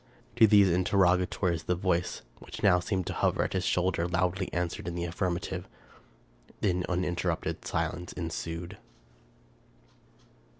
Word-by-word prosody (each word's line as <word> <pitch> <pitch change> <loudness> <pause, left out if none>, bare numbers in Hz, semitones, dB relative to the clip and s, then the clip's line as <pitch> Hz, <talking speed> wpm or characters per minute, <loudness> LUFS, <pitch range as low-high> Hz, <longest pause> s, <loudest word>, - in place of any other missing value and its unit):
To 115 -2 +8
these 100 -2 +6
interrogatories 90 -1 +2
the 90 - +1
voice, 90 -1 -1 0.2
which - - -10
now 95 -3 +5
seemed 95 0 -2
to - - -3
hover - - +1
at - - -3
his 95 -2 0
shoulder, 90 -2 +1
loudly 90 +2 0
answered 85 0 -3
in 85 - -3
the 85 0 -2
affirmative. 85 0 -3 0.9
Then 90 -3 0
uninterrupted 90 -1 -2
silence 90 +2 -2
ensued. 85 +2 -5
90 Hz, 125 wpm, -29 LUFS, 85-95 Hz, 0.9 s, To